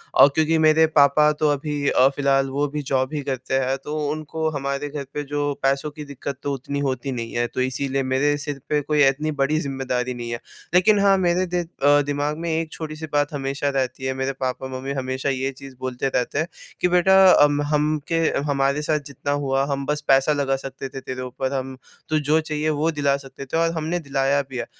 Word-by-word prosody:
अ, - - +9
क्योंकि 160 +1 +3
मेरे 160 0 +5
पापा 145 +2 +6
तो 155 - +4
अभी 145 +1 -2
अ, 130 - +5
फ़िलहाल 135 -1 +2
वो 140 +2 0
भी 150 +1 -4
ज़ॉब 130 0 -1
ही 150 - -2
करते 130 -1 -4
हैं 135 +1 0
तो 150 +1 -4
उनको 155 +1 -3
हमारे 140 +1 -3
घर 145 -1 -5
पे 145 - -3
जो 145 0 0
पैसों 135 +2 +1 0.2
दिक्कत 140 0 -6
तो 140 - -1
उतनी 140 +2 -4
होती 135 -1 -2
नहीं 115 -2 -5
है। 120 0 +1
तो 130 - -3
इसीलिए 135 +2 -1
मेरे 135 +3 +1
सिर 145 -1 -5
पे 150 - +2
कोई 150 0 +2
इतनी 150 +3 0
बड़ी 150 +3 +1
ज़िम्मेदारी 130 -3 -2
नहीं 120 -1 -6
है। 120 - -3 0.3
लेकिन 200 +4 +5
हाँ, 200 -1 +5
मेरे 180 0 +2
द 175 -1 0 0.2
अ, 145 +1 +6
दिमाग़ 145 +1 -1
में 170 +1 -3
एक 160 0 -1
छोटी-सी 155 0 -6
बात 145 0 +1
हमेशा 140 0 -2
रहती 130 0 -2
है, 130 - 0
मेरे 135 +1 -2
पापा-मम्मी 130 +1 -3
हमेशा 130 0 -2
ये 135 0 -1
चीज़ 135 0 -12
बोलते 130 0 -2
रहते 130 +1 -1
हैं 160 - 0 0.3
कि - - +4
बेटा 180 +2 +4 0.3
अम 145 0 +3
हम 150 +1 +1
के 165 - -1 0.3
हमारे 140 0 +1
साथ 150 0 0
जितना 140 0 -4
हुआ 135 0 +1
हम 140 0 -2
बस 150 +1 -1
पैसा 135 +2 +4
लगा 140 -2 0
सकते 135 0 -7
थे 135 0 -7
तेरे 130 0 -6
ऊपर, 130 +1 -3
हम 130 -1 -4 0.3
तू 155 0 +2
जो 150 +2 +2
चाहिए 155 0 -2
वो 155 +2 +1
दिला 140 -2 +1
सकते 135 0 -10
थे 135 - -2
और 165 0 +2
हमने 160 +3 -1
दिलाया 140 -2 +1
भी 130 - -6
है। - - -2
140 Hz, 215 wpm, -23 LUFS, 135-150 Hz, 0.3 s, अ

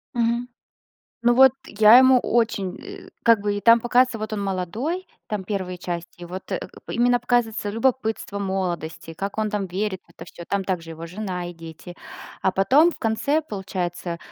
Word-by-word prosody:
Мгм. 235 +1 0 0.7
Ну 240 +1 +3
вот, 265 0 +7
я 215 +3 +7
ему 260 0 +6
очень, 220 -6 0
э, - - -10 0.2
как 230 -3 +5
бы, 205 0 -1
и - - -3
там 230 +2 +6
показывается, 245 0 +2
вот 215 0 -5
он 210 - -2
молодой, 215 - -3 0.2
там 210 -2 -3
первые 185 -2 -3
части 175 0 -6
и - - -5
вот, 185 +2 -8
э, - - 0 0.3
п - - -5
именно 245 +1 +3
показывается 235 -3 0
любопытство 225 -3 -1
молодости, 180 -5 -3
как 195 +4 -5
он 215 -1 -1
там 205 -2 -2
верит 190 +1 -3
в - - -26
это - - -11
всё, 170 - -11
там 200 -1 0
также 170 -3 -3
его 165 +1 -8
жена 180 -1 -5
и - - -9
дети. 165 +1 -11 0.4
А 190 - +1
потом, 275 - +4
в - - -12
конце, 280 +8 +1
получается, 180 - -4
205 Hz, 185 wpm, -23 LUFS, 180-235 Hz, 0.7 s, вот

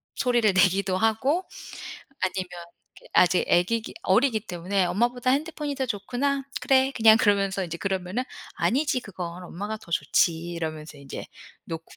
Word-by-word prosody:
소리를 240 -4 +2
내기도 190 0 +3
하고. 250 - +1 0.8
아니면 185 -1 -1 0.5
이게 - - -16
아직 180 0 +4
애기기 220 +6 +1
어리기 220 +3 +3
때문에 185 -1 -1
"엄마보다 240 +7 +1
핸드폰이 300 0 -1
더 265 -1 -1
좋구나. 255 +7 -1 0.2
그래." 265 0 +3
그냥 220 -1 +7
그러면서 200 -2 +2
이제 170 -1 -5
그러면은 190 +5 -2 0.3
"아니지 265 +1 +1
그건. 180 -4 -7
엄마가 205 +5 -5
더 215 - -17
좋지." 165 +2 +3 0.2
이러면서 155 -3 -5
이제 135 -1 -8 0.4
놓고 165 0 -6
200 Hz, 345 characters per minute, -26 LUFS, 180-245 Hz, 0.8 s, 그냥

